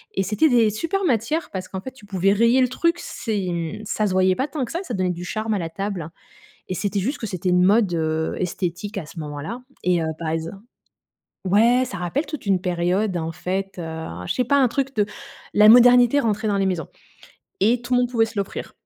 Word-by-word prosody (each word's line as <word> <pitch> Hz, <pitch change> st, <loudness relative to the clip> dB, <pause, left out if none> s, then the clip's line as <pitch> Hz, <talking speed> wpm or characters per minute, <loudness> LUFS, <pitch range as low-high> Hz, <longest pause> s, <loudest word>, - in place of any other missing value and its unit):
et 195 Hz, -, +1 dB
c'était 215 Hz, -, +2 dB
des 230 Hz, -4 st, +4 dB
super 330 Hz, -, -2 dB
matières 300 Hz, -, 0 dB
parce 185 Hz, -1 st, -5 dB
qu'en 190 Hz, -, -6 dB
fait 260 Hz, -, -7 dB
tu 255 Hz, -6 st, -17 dB
pouvais 195 Hz, 0 st, +2 dB
rayer 235 Hz, +5 st, +4 dB
le 255 Hz, -, +4 dB
truc. 335 Hz, +7 st, +1 dB
C'est, 210 Hz, -4 st, -3 dB
hem, 170 Hz, +3 st, -3 dB
ça 210 Hz, +1 st, 0 dB
se 190 Hz, -, -2 dB
voyait 185 Hz, 0 st, +3 dB
pas 265 Hz, +6 st, -1 dB
tant 295 Hz, -4 st, -3 dB
que -, -, -10 dB
ça, 340 Hz, -, -2 dB
ça 295 Hz, -, -6 dB
donnait 185 Hz, -1 st, 0 dB
du 175 Hz, 0 st, -6 dB
charme 215 Hz, +4 st, -2 dB
à 205 Hz, -, 0 dB
la 165 Hz, -2 st, -3 dB
table 185 Hz, -2 st, -4 dB, 0.6 s
et 185 Hz, -, -2 dB
c'était 200 Hz, +1 st, -1 dB
juste 265 Hz, +10 st, -2 dB
que 225 Hz, -, -4 dB
c'était 185 Hz, -3 st, -3 dB
une 180 Hz, 0 st, +4 dB
mode, 200 Hz, 0 st, +4 dB
heu, 160 Hz, -1 st, -1 dB
esthétique 185 Hz, +3 st, -3 dB
à 170 Hz, -, -6 dB
ce 165 Hz, -, -12 dB
moment-là 150 Hz, -, -6 dB, 0.2 s
et 180 Hz, -1 st, +2 dB
heu, -, -, -1 dB
par 165 Hz, -, -4 dB
exemple 165 Hz, +4 st, -3 dB, 0.9 s
ouais, 230 Hz, +7 st, +4 dB
ça 250 Hz, -, -6 dB
rappelle 180 Hz, -, -2 dB
toute 305 Hz, -7 st, -7 dB
une 195 Hz, -3 st, +2 dB
période, 180 Hz, +2 st, 0 dB
en 165 Hz, -1 st, -3 dB
fait, 190 Hz, +3 st, -4 dB
heu, 160 Hz, -1 st, -5 dB, 0.2 s
je -, -, 0 dB
sais 250 Hz, -, +2 dB
pas, 280 Hz, +4 st, +2 dB
un 265 Hz, -2 st, +5 dB
truc 270 Hz, +3 st, -2 dB
de 210 Hz, -2 st, +2 dB, 0.5 s
la 210 Hz, +1 st, +7 dB
modernité 245 Hz, +3 st, +7 dB
rentrait 220 Hz, -4 st, 0 dB
dans 205 Hz, -1 st, +1 dB
les 195 Hz, -, +1 dB
maisons 175 Hz, -5 st, -2 dB, 0.7 s
et 230 Hz, +5 st, +3 dB
tout 245 Hz, +1 st, -2 dB
le 245 Hz, -, +4 dB
monde 245 Hz, -1 st, 0 dB
pouvait 225 Hz, -2 st, +2 dB
se 225 Hz, -, -12 dB
l'offrir. 195 Hz, -, -4 dB
200 Hz, 230 wpm, -22 LUFS, 180-240 Hz, 0.9 s, la